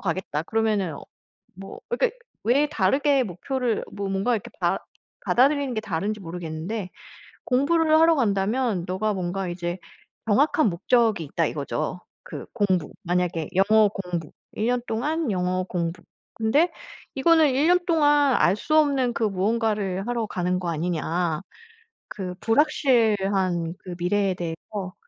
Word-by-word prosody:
가겠다 165 -4 -2
그러면은 210 -5 0 0.6
뭐" 195 +2 -10
그러니까 480 0 0 0.3
왜 270 +6 +3
다르게 285 -2 +2
목표를 235 +5 -2
뭐 200 -1 -4
뭔가 195 +5 +1
이렇게 210 - -5
받 - - +1 0.5
받아들이는 275 0 +3
게 220 - -1
다른지 205 +1 -3
모르겠는데 175 +3 -5 0.6
"공부를 315 +4 +3
하러 325 0 +5
간다면 210 - 0
너가 210 +4 -1
뭔가 185 0 -3
이제 175 0 -4 0.5
정확한 275 +3 +3
목적이 215 +1 +1
있다." 160 +3 0
이거죠. 155 +4 -3 0.2
그 - - -8
공부 185 -7 0
만약에 175 -2 -1
영어 210 +2 +5
공부, 180 -6 -5 0.2
1 220 +2 -1
년 245 0 +1
동안 295 +3 -1
영어 185 0 0
공부. 175 -1 -3 0.3
근데 280 +11 +2 0.4
"이거는 315 +2 +4
1 275 +5 +2
년 360 +1 +5
동안 290 -5 +4
알 180 - +4
수 310 +8 -1
없는 275 -5 +2
그 230 - -2
무언가를 205 -1 0
하러 235 -2 -1
가는 180 -1 -1
거 175 - -3
아니냐." 165 0 -1 0.7
그 185 -3 -5
불확실한 205 - +2
그 180 -1 -8
미래에 195 +2 +1
대해서 180 +3 -6
205 Hz, 285 characters per minute, -24 LUFS, 180-255 Hz, 0.7 s, 하러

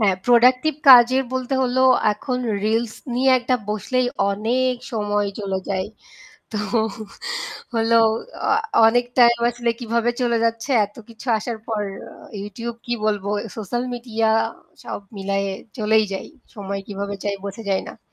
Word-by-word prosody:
হ্যাঁ, 195 -3 +3
productive 255 +5 +4
কাজের 255 +1 +8
বলতে 260 +1 -2
হল 250 0 -1 0.4
এখন 250 +4 -3 0.3
reels 225 +1 0 0.2
নিয়ে 260 +2 +3
একটা 250 +1 0
বসলেই 230 +5 0 0.2
অনেক 245 +5 0 0.2
সময় 205 -2 0
চলে 195 -2 -2
যায়। 190 -1 -1 0.6
তো 220 - -4 1.2
হলো 230 0 +2 0.5
আ - - +1 0.4
অনেক 245 +2 +3
time 235 -1 +6
আসলে 240 0 -1
কিভাবে 235 0 0
চলে 235 -1 +2
যাচ্ছে 230 +3 -1
এত 205 +1 -12
কিছু 230 +1 -13
আসার 230 +1 -5
পর। 220 -2 -1 0.3
আ - - -13 0.3
YouTube 230 +3 -6
কি 240 - -2
বলবো 205 -2 -1 0.3
social 220 +3 -3
media 230 -2 -3 0.6
সব - - -5 0.2
মিলায়ে 195 0 -1 0.3
চলেই 220 0 +3
যাই। 190 - -4 0.3
সময় 200 -2 -4
কিভাবে 200 0 -4
যায় 200 -1 -1
বোঝা 200 +3 -6
যায় 190 - +1
না। - - -10
225 Hz, 140 wpm, -22 LUFS, 205-245 Hz, 1.2 s, কাজের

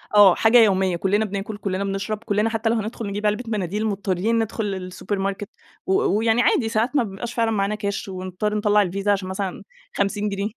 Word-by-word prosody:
آه، 200 -3 +8
حاجة 225 +2 +5
يوميّة، 190 -5 +4
كلنا 200 +5 +1
بناكل، 200 +1 -5
كلنا 195 -1 -2
بنشرب، 195 +2 -2
كلنا 210 +1 +1
حتّى 225 0 -1
لو 230 - +2
هندخل 220 0 -4
نجيب 205 +1 -4
علبة 210 +4 +1
مناديل، 210 -1 -2
مُضطرين 200 +2 0
ندخل 225 0 -2
السوبر 190 +2 -5
ماركت، 195 +2 -3 0.4
و 385 - +1 0.2
ويعني 225 +1 +2
عادي 230 -2 +2
ساعات 225 +6 0
ما 260 - +4
بيبقاش 215 +4 -6
فعلًا 230 -1 +1
معانا 205 0 0
كاش، 205 +1 -3
ونضطر 185 +3 -3
نطلع 210 0 +3
الفيزا 200 +2 0
عشان 190 -2 -1
مثلًا 190 -1 -4 0.3
50 205 +1 0
جنيه 200 +1 -2
205 Hz, 195 wpm, -23 LUFS, 195-220 Hz, 0.4 s, آه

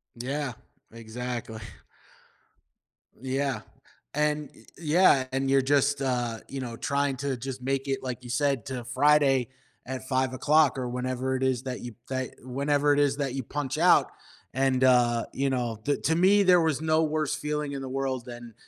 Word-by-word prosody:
Yeah, 130 +2 -3 0.4
exactly. 115 0 -6 1.6
Yeah, 135 -2 -1 0.5
and 150 0 0
Y - - -18 0.2
yeah, 155 -4 +4
and 135 0 0
you're 135 0 +4
just, 140 +1 +2
uh, 120 -3 -1
you 135 -1 -5
know, 120 -2 -5
trying 140 +1 0
to 140 0 -2
just 130 +1 -6
make 135 +1 -2
it, 135 - -1
like 125 -1 -5
you 120 - -8
said, 135 0 0
to 125 -3 -5
Friday 135 0 +3 0.4
at 130 0 -6
5:00 130 +3 +2
or 125 -1 -2
whenever 130 +1 -2
it 130 - -4
is 130 -2 +1
that 130 -1 -5
you 120 -2 -8 0.2
that 130 -1 -2
whenever 140 +3 +1
it 145 - +2
is 140 -1 +2
that 135 -3 -2
you 135 - -2
punch 145 +3 -4
out, 175 +2 +5 0.4
and, 130 0 +1
uh, 120 -2 +4
you 135 0 0
know, 120 -4 -2
the 145 - +1
To 160 - 0
me, 195 +3 +5
there 180 -2 +5
was 160 -3 +1
no 160 0 +2
worse 155 -1 -1
feeling 150 -1 -3
in 135 -1 -5
the 130 - -5
world 130 -2 -2
than 120 -2 -10
135 Hz, 175 wpm, -27 LUFS, 125-145 Hz, 1.6 s, out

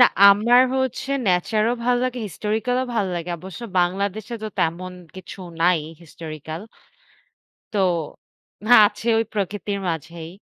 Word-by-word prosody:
না - - +10 0.3
আমার 235 +5 +5
হচ্ছে 260 +1 -2 0.2
ন্যাচার 195 +4 +2
ও - - 0
ভালো 245 0 +3
লাগে 255 -1 -2
হিস্টোরিক্যাল 220 +8 -2
ও - - -2
ভালো 200 -4 0
লাগে 170 +1 -5
অবশ্য 190 +5 -9 0.2
বাংলাদেশে 200 +5 -2
তো 215 - -3
তেমন 175 +3 -1 0.2
কিছু 185 +1 -10 0.2
নাই 175 -2 +4 0.2
হিস্টোরিক্যাল 155 0 -8 1.1
তো - - +1 0.9
হ্যাঁ, 240 -3 +9
আছে 235 - -7
ওই 225 - +1
প্রকৃতির 205 0 -2
মাঝেই। 165 +1 -5
200 Hz, 140 wpm, -22 LUFS, 170-225 Hz, 1.1 s, না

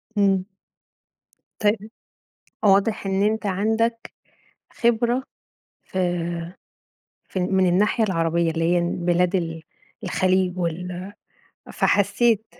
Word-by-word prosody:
امم. 195 -2 +2 1.1
طيب، 210 0 0 0.7
واضح 200 +1 +3
إن 195 0 +1
أنت 215 0 0
عندك 220 +4 0 0.6
خبرة 240 +2 +1 0.6
ف - - -8 1.3
ف - - -4
من 185 +1 +2
الناحية 210 +5 +2
العربية 165 -3 +1
اللي 165 0 -1
هي - - +3
بلاد 175 +1 0
ال 165 -2 -3 0.4
الخليج 185 0 +1
وال 180 +2 -4 0.6
فحسيت، 210 +2 +2
195 Hz, 90 wpm, -23 LUFS, 180-215 Hz, 1.3 s, واضح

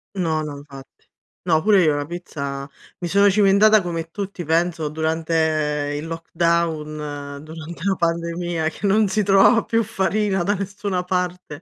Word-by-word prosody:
No, 160 -4 0
no, 150 -2 -6
infatti. 135 -2 -14 0.4
No, 160 -3 +2
pure 200 -1 +4
io 155 -3 +3
la 145 0 -2
pizza 140 -5 -6 0.3
mi 175 - -3
sono 200 +4 +4
cimentata 205 +2 +5
come 165 -2 -4
tutti 195 0 -5
penso 165 -1 0
durante 155 -2 0
il 150 - -6
lockdown, 155 -4 -2
durante 160 +2 -9
la 195 0 +1
pandemia 170 -1 -1
che 180 - -7
non 210 +2 +3
si 195 +3 0
trovava 195 +4 +5
più 230 0 +1
farina 200 -2 0
da 205 +3 +1
nessuna 195 -1 -3
parte, 180 -4 -3
170 Hz, 150 wpm, -21 LUFS, 155-195 Hz, 0.4 s, cimentata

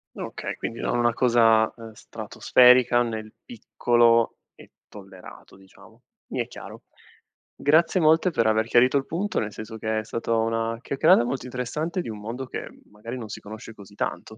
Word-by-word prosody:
Okay, - - -6
quindi 115 - -6
non 120 - -1
una 120 0 +2
cosa, 115 -2 +3
ehm, 115 -1 -11
stratosferica 125 +2 +3
nel 110 -2 -4
piccolo 120 - +1 0.2
è - - -16 0.2
tollerato, 95 -3 -14
diciamo. 95 0 -19 0.3
Mi - - -2
è - - -4
chiaro. - - -11 0.7
Grazie 165 +5 +2
molte 160 +3 +4
per 115 - 0
aver 110 0 +2
chiarito 125 +4 +3
il 135 - -2
punto, 190 +5 -2
nel 105 -1 -4
senso 110 +1 -8
che 110 0 -2
è - - -5
stato 115 +1 -2
una 115 0 -1
chiacchierata 135 -3 +3
molto 130 +2 -4
interessante 150 +8 -3
di 145 - -7
un 105 -1 -7
mondo 120 +5 -6
che - - -6 0.2
magari 115 +4 -8
non 110 -3 -8
si - - -7
conosce 110 +2 -10
così 100 -1 -15
tanto. 110 - -5
115 Hz, 170 wpm, -24 LUFS, 110-125 Hz, 0.7 s, molte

